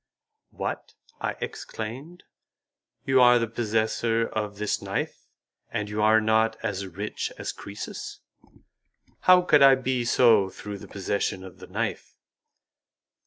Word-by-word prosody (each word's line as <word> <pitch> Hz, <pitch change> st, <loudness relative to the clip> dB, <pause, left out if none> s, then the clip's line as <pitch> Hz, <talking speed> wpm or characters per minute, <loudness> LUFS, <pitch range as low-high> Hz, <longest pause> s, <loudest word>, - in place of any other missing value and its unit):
"What!" -, -, -5 dB, 0.2 s
I -, -, -2 dB
exclaimed, 130 Hz, +11 st, -7 dB, 0.8 s
"you 130 Hz, -1 st, +4 dB
are 125 Hz, 0 st, +7 dB
the 115 Hz, -1 st, 0 dB
possessor 115 Hz, 0 st, 0 dB
of 105 Hz, -2 st, -4 dB
this 105 Hz, 0 st, -1 dB
knife, -, -, -4 dB, 0.4 s
and 105 Hz, 0 st, -3 dB
you 105 Hz, 0 st, -2 dB
are 110 Hz, +1 st, +5 dB
not 110 Hz, +1 st, +2 dB
as 100 Hz, -3 st, -3 dB
rich 100 Hz, +4 st, -4 dB
as -, -, -4 dB
Croesus?" 100 Hz, +1 st, -8 dB, 1.1 s
"How 180 Hz, 0 st, +8 dB
could 150 Hz, -5 st, +4 dB
I 135 Hz, -1 st, +8 dB
be 130 Hz, -1 st, -1 dB
so 115 Hz, -5 st, +4 dB
through 100 Hz, +1 st, -8 dB
the -, -, -11 dB
possession 100 Hz, -1 st, -2 dB
of 95 Hz, -2 st, -12 dB
the -, -, -11 dB
knife?" -, -, -4 dB
110 Hz, 130 wpm, -26 LUFS, 105-120 Hz, 1.1 s, How